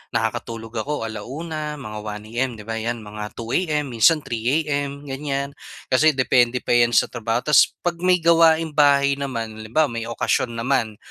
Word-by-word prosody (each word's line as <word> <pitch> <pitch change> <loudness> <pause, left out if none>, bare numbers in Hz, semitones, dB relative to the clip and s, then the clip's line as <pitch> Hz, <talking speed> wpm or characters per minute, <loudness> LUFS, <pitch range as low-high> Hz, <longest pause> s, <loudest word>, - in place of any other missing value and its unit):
nakakatulog 115 0 -3
ako 120 +3 -3
ala-una, 150 +7 -5
mga 110 -7 -8
1 105 0 -6
AM, 130 +3 0
'di 105 - -10
ba, 115 +1 -4
'yan, 115 0 -3
mga 105 0 -6
2 115 0 -6
AM, 150 -6 0
minsan 150 +7 +4
3 120 +7 0
AM, 145 -1 -3
ganyan. 140 0 -3 0.4
Kasi 150 +3 +4
depende 125 -1 +2
pa - - -2
'yan 120 -1 +4
sa - - +3
trabaho. 115 +1 -2
Tapos 150 -4 +4
'pag 175 -1 -1
may 180 -1 +2
gawaing 165 -1 +4
bahay 140 -1 +3
naman, 115 -5 -3
halimbawa, 120 +7 0
may 115 0 -4
okasyon 115 +1 -1
naman, 115 -2 0
130 Hz, 175 wpm, -22 LUFS, 115-150 Hz, 0.4 s, minsan